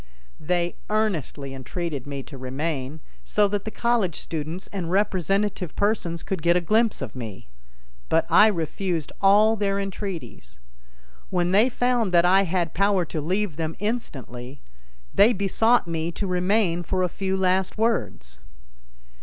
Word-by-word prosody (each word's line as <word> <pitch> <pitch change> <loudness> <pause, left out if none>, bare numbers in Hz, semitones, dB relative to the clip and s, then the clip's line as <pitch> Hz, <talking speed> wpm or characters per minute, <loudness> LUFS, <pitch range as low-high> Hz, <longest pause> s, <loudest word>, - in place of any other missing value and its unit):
They 175 +2 -1
earnestly 170 - -1
entreated 140 +1 -5
me 140 -1 -5
to 140 - -11
remain 135 +2 -4 0.2
so 210 -1 +2
that 205 -1 -2
the - - -2
college 225 -7 0
students 160 +3 -5
and 180 -4 -3
representative 195 -1 0
persons 190 -5 0
could 190 -4 -3
get 170 +2 +3
a - - +4
glimpse 215 - +1
of 125 -3 -7
me; 110 - -8 0.6
but 165 0 +3
I 210 - +7
refused 175 -3 -2
all 210 +3 +5
their 200 -2 0
entreaties. 190 - -6 0.7
When 175 -1 0
they 210 +6 +5
found 245 -4 +1
that 170 0 +6
I 190 +2 +5
had 175 -2 -1
power 195 -1 +2
to 155 0 -4
leave 185 +1 -1
them 160 -1 -3
instantly, 140 - -5 0.5
they 215 +4 +6
besought 220 +4 +2
me 165 0 -2
to 200 - -3
remain 180 -1 +1
for 185 +2 -1
a - - +2
few 190 +2 -2
last 185 +1 +1
words. 135 - -1
180 Hz, 145 wpm, -24 LUFS, 160-205 Hz, 0.7 s, I